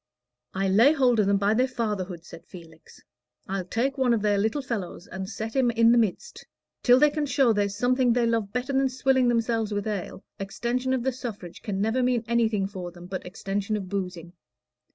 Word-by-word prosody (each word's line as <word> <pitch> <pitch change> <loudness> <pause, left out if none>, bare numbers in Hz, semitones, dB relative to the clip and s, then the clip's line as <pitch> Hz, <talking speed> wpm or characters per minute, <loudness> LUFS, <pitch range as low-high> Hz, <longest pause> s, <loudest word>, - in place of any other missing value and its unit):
"I'll 195 0 0
lay 235 +10 +6
hold 255 -6 +3
of 205 - +3
them 200 0 +3
by 200 +2 +2
their 250 +3 +2
fatherhood," 200 -8 -4
said 165 - -13
Felix; 165 -3 -14 0.5
"I'll 190 -1 -3
take 265 +8 -1
one 250 -3 +3
of 215 - -3
their 205 -1 +2
little 220 +7 0
fellows 200 -7 -5
and 190 +1 -6
set 220 +1 -5
him 260 -2 +3
in 230 0 +4
the 240 - +5
midst. 215 -6 -2 0.4
Till 245 0 +6
they 300 +2 +5
can 295 -1 -2
show 255 -3 +3
there's 205 -1 0
something 250 +1 +2
they 240 0 +2
love 225 -3 0
better 250 +4 -3
than 270 0 +2
swilling 260 0 +2
themselves 230 -2 0
with 205 -1 -2
ale, 205 -3 -4 0.2
extension 245 +6 -2
of 255 -2 -1
the 265 - +1
suffrage 220 -9 -8
can 205 -4 -3
never 225 +5 +1
mean 250 -2 +1
anything 225 -4 +1
for 190 -3 -6
them 175 0 -12
but 185 0 -6
extension 200 +3 -3
of 190 -3 -6
boozing. 180 -3 -5
220 Hz, 205 wpm, -26 LUFS, 195-250 Hz, 0.5 s, lay